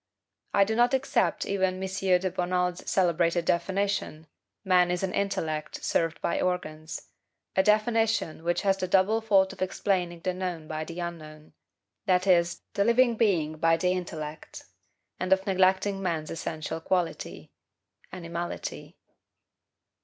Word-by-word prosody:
I 200 - +5
do 220 +3 -1
not 240 +3 +4
except 265 -2 0
even 190 -2 0
M. 190 +1 -4
de 185 -1 +1
Bonald's 180 0 -1
celebrated 170 -2 +2
definition, 190 -2 -1 0.4
MAN 180 -2 +4
IS 180 +1 -1
AN 190 - -1
INTELLECT 160 -6 -2
SERVED 165 -1 0
BY - - 0
ORGANS 160 -4 -3 0.5
a 190 - +5
definition 215 -4 +1
which 175 +2 0
has 195 -1 +2
the 185 - -2
double 195 +5 +3
fault 195 -3 +3
of - - -14
explaining 180 -2 -1
the 185 +1 -1
known 180 -4 -4
by 155 0 -4
the 170 +2 -7
unknown; 155 -3 -7 0.5
that 185 0 +3
is, 175 -2 +2
the 200 - +2
living 235 +2 +4
being 170 -9 +1
by 165 +1 +3
the 180 +2 +1
intellect; 160 -4 -5 0.6
and 185 0 -3
of 190 0 +4
neglecting 190 +1 +2
man's 165 -4 -2
essential 160 0 -4
quality, 180 -1 -2 0.6
animality. 170 -1 -6
180 Hz, 140 wpm, -27 LUFS, 170-195 Hz, 0.6 s, I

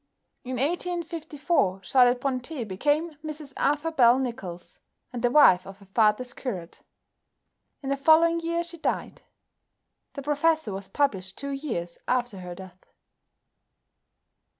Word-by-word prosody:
In 255 0 -4
1854 320 - -1
Charlotte 250 +2 +4
Brontë 260 -1 -3
became 295 - 0
Mrs 305 -3 -6
Arthur 295 +3 0
Bell 245 -5 +5
Nicholls, 195 -9 -5 0.3
and 240 - -4
the 245 - +3
wife 190 -10 +6
of 195 0 -10
her 200 - -17
father's 220 +5 +1
curate. 185 -10 -6 1.0
In 270 - -3
the 275 - 0
following 325 +4 +5
year 335 +1 -1
she 340 -1 -10
died. - - -3 0.9
"The 280 - -7
Professor" 295 -4 +1
was 195 0 -6
published 195 -10 -1
two 280 0 -4
years 230 - -4
after 245 -5 0
her 180 -1 -7
death. 185 0 -12
260 Hz, 125 wpm, -26 LUFS, 200-310 Hz, 1.0 s, wife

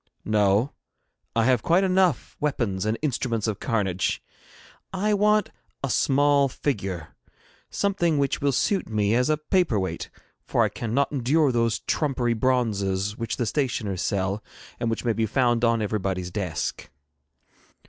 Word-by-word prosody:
'No; 105 +4 +2 0.6
I 115 -1 +3
have 125 -3 +3
quite 175 - +3
enough 185 -6 +1
weapons 110 -9 -1
and 110 +1 0
instruments 120 -6 -1
of 110 -3 -2
carnage. 95 -5 0 0.7
I 205 +3 0
want 210 +1 +3 0.3
a 135 - -1
small 140 0 +3
figure, 95 - -3 0.6
something 175 -6 +1
which 140 -1 0
will 140 0 +2
suit 190 - 0
me 105 -1 +1
as 125 +4 +2
a 155 - +3
paper 155 - +1
weight, 95 -1 -4 0.3
for - - +1
I - - +2
cannot 120 +5 -1
endure 140 +2 +2
those 115 -2 +1
trumpery 130 -6 0
bronzes 105 -5 0
which 115 0 -4
the 120 - 0
stationers 110 - -1
sell, 100 0 -1 0.4
and 120 -2 0
which 115 +2 -3
may 115 - +2
be 110 +1 0
found 120 +1 +1
on 115 -2 +3
everybody's 95 -4 -2
desk.' 90 -5 -3
120 Hz, 145 wpm, -25 LUFS, 105-145 Hz, 0.7 s, I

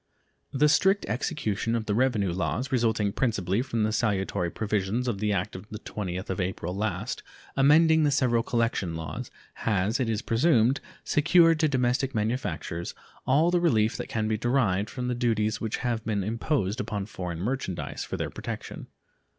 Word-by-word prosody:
The 145 +2 +3
strict 190 +7 +3
execution 115 - -1
of 115 -2 -2
the 105 - 0
revenue 110 -5 +2
laws, 115 +8 -2
resulting 110 -5 +1
principally 105 -4 0
from 115 -4 -1
the 110 - +1
salutary 95 -5 0
provisions 105 +4 -1
of 110 -5 -1
the 105 0 0
act 100 0 -1
of 95 +3 -9
the 105 - -6
20th 95 -3 -5
of 95 - -2
April 90 -1 -3
last 100 -3 -2 0.3
amending 160 +4 +5
the 150 - +3
several 125 -4 +2
collection 115 -8 -1
laws, 80 -3 -5 0.3
has, 105 +3 +1
it 125 -3 0
is 110 +1 -1
presumed, 125 0 +3 0.2
secured 165 +2 +4
to 155 - +4
domestic 130 -1 0
manufactures 105 -6 -2 0.3
all 150 +6 +4
the 175 -1 +2
relief 110 -10 +3
that - - -5
can 110 -1 -1
be 110 0 0
derived 110 -5 +1
from 125 -2 -4
the 125 - 0
duties 110 -3 0
which 110 -1 -2
have 115 -2 -1
been 105 -4 -1
imposed 115 0 -1
upon 105 -5 -3
foreign 90 -5 -5
merchandise 105 -3 -3
for - - -5
their - - -3
protection. - - -6
115 Hz, 170 wpm, -27 LUFS, 100-130 Hz, 0.3 s, amending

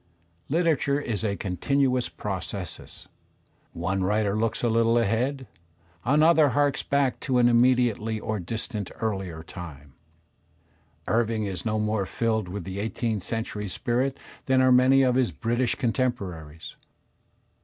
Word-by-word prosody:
Literature 155 -3 +2
is 115 -7 -3
a 100 -2 0
continuous 125 +7 0
processus; 95 -2 -6 0.7
one 95 +3 -2
writer 105 +1 +1
looks 115 +2 -1
a - - +3
little 115 +1 +3
ahead, 120 +5 0 0.6
another 155 +3 +5
harks 145 -1 +2
back 135 -4 0
to 130 -2 0
an 120 -1 +5
inunedi 120 0 +4
ately 110 0 -4
or 110 0 -3
distantly 105 +2 -5
earUer 95 -7 -3
time. 75 -6 -10 1.1
Irving 115 -1 +1
is 100 +1 -4
no 110 0 0
more 105 -2 0
filled 110 -1 -1
with 95 +1 -5
the 95 +2 -6
eighteenth 110 0 -2
century 110 0 -4
spirit 125 +7 -1 0.3
than 130 0 +4
are 130 0 +5
many 130 +2 +6
of 125 -1 +3
his 125 -1 +2
British 120 +1 0
contemporaries. 95 - -3
115 Hz, 135 wpm, -26 LUFS, 100-130 Hz, 1.1 s, many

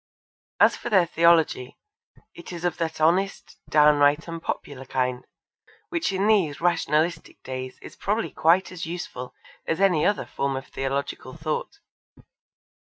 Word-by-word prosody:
As - - +6
for - - -6
their 190 -6 +5
theology, 165 -6 +2 0.6
it 170 - -11
is 175 0 -5
of 175 -1 0
that 160 -2 -3
honest, 180 +5 +1
downright 150 0 +4
and 165 -1 -6
popular 140 -4 -5
kind, 125 -1 -2 0.6
which 335 - -1
in 195 +1 0
these 195 -9 +2
rationalistic 165 -1 0
days 130 0 -6
is - - -11
probably 215 +3 -1
quite 175 +4 +3
as 180 -2 -6
useful 165 -7 -6 0.3
as 165 - -1
any 185 -6 +3
other 205 - +1
form 140 -1 -2
of 135 +1 -5
theological 135 0 -4
thought. 155 - -3
165 Hz, 140 wpm, -25 LUFS, 145-180 Hz, 0.6 s, As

